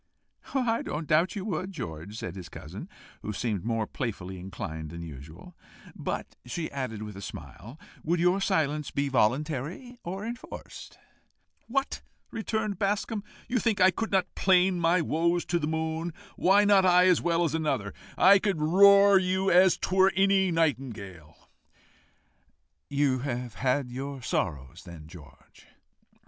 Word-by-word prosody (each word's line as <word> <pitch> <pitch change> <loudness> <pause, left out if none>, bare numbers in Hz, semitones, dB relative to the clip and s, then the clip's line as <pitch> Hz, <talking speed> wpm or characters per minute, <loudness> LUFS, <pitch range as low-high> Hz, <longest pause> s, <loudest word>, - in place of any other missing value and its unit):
"I 240 -4 +1
don't 155 +2 -4
doubt 165 +6 +2
you 200 -2 -4
would, 185 -1 -3
George," 85 - -7
said 90 -5 -6
his 90 -3 -8
cousin, - - -9 0.3
who 105 - -4
seemed 105 -3 -2
more 115 -1 -1
playfully 95 -7 -5
inclined 80 -4 -6
than 85 +2 -8
usual. 80 - -11 0.4
"But," - - -5
she 155 +7 -5
added, 125 -6 -4
with 105 -2 -8
a 100 - -8
smile, 115 +6 -10 0.2
"would 170 +2 0
your 180 +3 +2
silence 155 -6 0
be 140 0 -1
voluntary, 150 - -1
or 190 +4 -5
enforced?" 235 +2 -9 0.7
"What!" 275 +3 -2 0.3
returned 220 -3 -2
Bascombe, 205 +1 -1 0.2
"you 250 0 0
think 220 -3 0
I 185 0 +6
could 225 +5 -4
not 190 -2 +1
plain 185 -1 +3
my 170 +1 +3
woes 170 +2 0
to 175 - 0
the 150 - -2
moon? 160 +1 -2 0.2
Why 200 +3 +4
not 200 -2 +5
I 180 0 +5
as 180 -2 +4
well 170 0 +1
as 160 -3 0
another? 150 -11 -1 0.2
I 195 +2 +7
could 195 -5 -1
roar 200 +5 +6
you 190 +1 0
as 185 +1 +5
'twere 190 +1 +3
any 195 -1 +3
nightingale." 115 - -3 1.4
"You 140 -2 +1
have 125 -3 -4
had 125 +4 -1
your 135 +1 -6
sorrows, 70 - -3
then, 85 -3 -11
George?" 75 -5 -16
160 Hz, 150 wpm, -28 LUFS, 115-190 Hz, 1.4 s, I